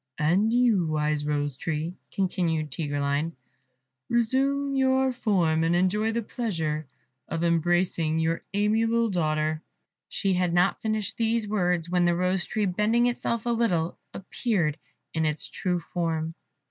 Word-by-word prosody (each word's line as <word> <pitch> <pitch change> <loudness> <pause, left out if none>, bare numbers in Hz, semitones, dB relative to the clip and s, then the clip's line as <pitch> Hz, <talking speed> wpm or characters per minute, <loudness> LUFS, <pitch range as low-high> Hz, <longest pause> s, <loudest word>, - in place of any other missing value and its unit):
"And 185 +9 +2
you, 235 -8 +3
wise 150 -1 0
Rose 145 -2 -1
tree," 160 +4 -3 0.2
continued 165 -5 -1
Tigreline, 145 +2 -1 0.8
"resume 275 +4 +1
your 265 0 +3
form, 180 -10 +1
and 165 +1 +2
enjoy 205 +5 +2
the 230 +1 -2
pleasure 165 - -3 0.4
of 165 +1 -3
embracing 170 -1 +1
your 165 +1 0
amiable 225 +2 +2
daughter." 155 -2 0 0.5
She 195 -2 0
had 180 -1 +1
not 180 +2 +2
finished 215 -2 -2
these 230 -1 +1
words 180 -5 0
when 180 0 +2
the 175 0 +3
Rose 180 +1 +1
tree, 215 -1 -1
bending 210 +6 +2
itself 235 -1 -1
a 240 - +1
little, 180 -8 +1 0.2
appeared 190 - -1 0.4
in 160 - 0
its 155 -1 -1
true 180 -2 -2
form. 165 -2 -2
180 Hz, 135 wpm, -26 LUFS, 160-220 Hz, 0.8 s, you